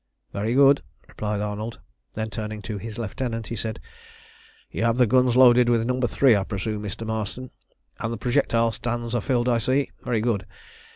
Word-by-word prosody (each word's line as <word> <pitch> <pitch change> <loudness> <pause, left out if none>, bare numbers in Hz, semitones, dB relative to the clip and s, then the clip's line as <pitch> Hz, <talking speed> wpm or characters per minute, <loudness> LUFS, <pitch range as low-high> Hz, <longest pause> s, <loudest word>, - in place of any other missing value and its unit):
"Very 110 +4 -1
good," 140 0 +6 0.3
replied 105 -1 -3
Arnold. 105 +2 -4 0.3
Then, 110 0 -4
turning 105 0 -5
to 105 -1 -5
his 110 +1 -7
lieutenant, 115 0 -3
he 115 - -3
said 110 0 -4 0.9
"You 110 - -2
have 115 +1 +2
the 125 - +5
guns 125 +1 +3
loaded 125 -1 +7
with 115 -1 +2
No. 125 +1 -1
3, 125 0 +4
I 100 - +1
presume, 105 +2 -3
Mr. 105 +2 -5
Marston, 110 +3 -4 0.5
and 115 - -2
the 115 - -3
projectile 120 -2 +1
stands 120 0 -4
are 120 - +1
filled, 125 0 0
I 120 -2 +3
see. 130 +4 0
Very 115 -3 0
good. 110 -4 -1
115 Hz, 180 wpm, -24 LUFS, 110-125 Hz, 0.9 s, loaded